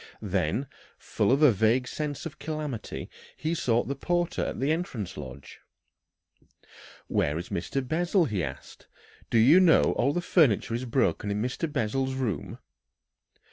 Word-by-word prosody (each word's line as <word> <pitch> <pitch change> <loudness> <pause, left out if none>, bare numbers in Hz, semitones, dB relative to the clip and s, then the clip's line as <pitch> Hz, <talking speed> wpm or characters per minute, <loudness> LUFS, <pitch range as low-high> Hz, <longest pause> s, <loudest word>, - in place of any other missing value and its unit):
Then, 95 - 0 0.3
full - - 0
of 140 +4 +3
a 150 - +8
vague 110 +5 +2
sense 150 +4 -4
of 155 -2 -7
calamity, 150 -6 -5 0.3
he 160 +2 -2
sought 120 -7 +1
the 140 - -1
porter 175 +4 -1
at - - -4
the 140 +3 +1
entrance 125 - -3
lodge. 70 -1 -10 1.5
"Where 75 +2 0
is 85 - -6
Mr. 130 +10 -3
Bessel?" 175 +4 +2
he 105 - -2
asked. 65 - -8 0.4
"Do - - +2
you 135 +11 +7
know 180 -4 +6
that - - +2
all 140 - +1
the 175 - -1
furniture 145 - +3
is 120 +2 -2
broken 115 -3 0
in 100 0 -1
Mr. 125 +7 -2
Bessel's 130 +1 -1
room?" 115 - -3
130 Hz, 155 wpm, -27 LUFS, 105-155 Hz, 1.5 s, a